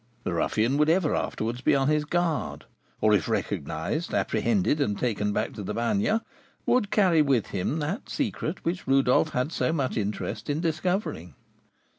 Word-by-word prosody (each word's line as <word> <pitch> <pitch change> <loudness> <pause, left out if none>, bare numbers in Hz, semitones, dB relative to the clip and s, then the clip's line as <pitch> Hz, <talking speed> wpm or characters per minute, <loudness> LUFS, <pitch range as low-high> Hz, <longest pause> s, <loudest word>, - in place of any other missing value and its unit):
The - - -2
ruffian 110 +10 +1
would 150 +1 +3
ever 165 -2 +3
afterwards 115 +3 -2
be - - +3
on 135 -1 +2
his 150 0 +2
guard, 170 0 -1 0.4
or 105 0 +4
if 95 -6 +2
recognised, 90 - -2
apprehended, 180 -9 +1
and 105 -7 0
taken 105 -4 0
back - - -1
to - - -7
the 95 - -4
Bagne, 205 - +1 0.4
would 230 -5 +2
carry 185 -7 +4
with 135 -7 +2
him 100 - -1
that 180 - -3
secret 195 - -3
which 170 -1 -2
Rodolph 135 -1 +4
had 125 +5 -1
so 160 - 0
much 140 -7 -1
interest 105 +2 -3
in 145 +1 0
discovering. 160 - -2
145 Hz, 165 wpm, -27 LUFS, 110-170 Hz, 0.4 s, or